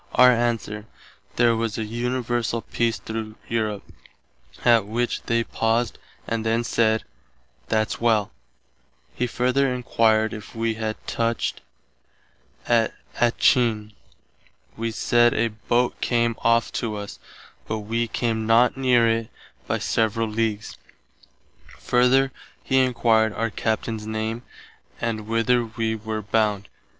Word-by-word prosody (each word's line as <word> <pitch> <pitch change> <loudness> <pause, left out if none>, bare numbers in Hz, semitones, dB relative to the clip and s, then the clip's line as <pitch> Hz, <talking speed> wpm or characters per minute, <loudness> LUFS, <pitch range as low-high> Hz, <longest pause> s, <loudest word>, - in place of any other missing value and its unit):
Our 125 0 +8
answer, 115 -3 -1 0.5
there 120 -1 +4
was 115 -1 -2
an 110 -2 -3
universall 120 0 -2
peace 115 -1 +1
through 110 -1 -6
Europe, 110 -3 -2 0.8
att 115 -4 +5
which 120 +3 -1
they 115 -1 +2
paused 115 0 -1 0.3
and 115 -1 -1
then 115 +1 +1
said, 110 -2 +1 0.6
"That's 110 0 0
well." 110 -3 +2 0.8
He 125 - -1
further 130 +3 +1
enquired 110 -3 +2
if 105 -2 -9
had 110 -1 -2
touched 115 -1 -1 1.0
at 115 -2 +2 0.2
Attcheen. 115 -3 +2 0.8
Wee 115 +1 -2
said 120 +1 +3
a 115 +1 +1
boat 120 +3 -1
came 115 -1 +1
off 115 0 +2
to 110 -3 -3
us, 105 -1 -7 0.5
but 110 0 -3
[wee] 115 +3 -1
came 110 -1 -1
not 115 +2 +4
near 125 -3 +3
itt 115 0 0 0.4
by - - 0
several 115 0 0
leagues. 110 -1 -2 1.0
Further 130 +2 +3 0.3
he 130 - +2
enquired 115 -4 +3
our 115 0 -2
Captain's 110 +1 -2
name 110 +1 -3 0.6
and 110 -2 -3
whither 115 +2 +2
wee 110 0 -2
were 110 0 -4
bound. 105 -1 0
115 Hz, 120 wpm, -24 LUFS, 110-120 Hz, 1.0 s, Our